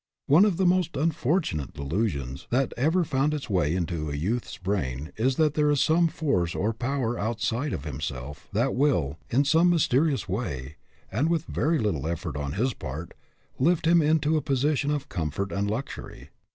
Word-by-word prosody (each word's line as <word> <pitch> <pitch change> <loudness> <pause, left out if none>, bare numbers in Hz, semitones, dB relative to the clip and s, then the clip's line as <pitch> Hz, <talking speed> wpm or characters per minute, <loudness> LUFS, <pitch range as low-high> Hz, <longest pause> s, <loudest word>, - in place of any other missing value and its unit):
One 160 +9 +6
of 195 -5 +1
the 190 - +2
most 180 -3 +2
unfortunate 145 - 0
delusions 70 - -2
that 130 +2 +1
ever 160 +8 +2
found 150 0 +1
its 140 -7 -6
way 85 -4 +2
into 85 -4 -2
a 70 - -3
youth's 105 +12 -2
brain 80 -8 -2
is 130 +4 +1
that 155 -1 +2
there 150 -1 +2
is 145 -1 +2
some 165 +4 +4
force 115 - 0
or 110 +4 0
power 120 0 -2
outside 115 +6 -1
of 70 - -4
him 75 -2 -5
self 70 +1 -6
that 120 +6 +1
will, 90 - +1
in 140 +4 +2
some 165 +5 +4
mysterious 140 - +2
way, 75 - -4 0.3
and 130 +11 +1
with 170 -3 0
very 160 +3 +1
little 95 - -1
effort 85 -4 -3
on 70 -1 -3
his 125 +7 0
part, 80 +3 -7 0.5
lift 165 +5 +2
him 170 +1 +5
into 155 0 +2
a - - 0
position 140 +1 +1
of 145 -2 -1
comfort 85 +3 -3
and 100 +1 -1
luxury. 120 +6 -6
120 Hz, 180 wpm, -26 LUFS, -, 0.5 s, One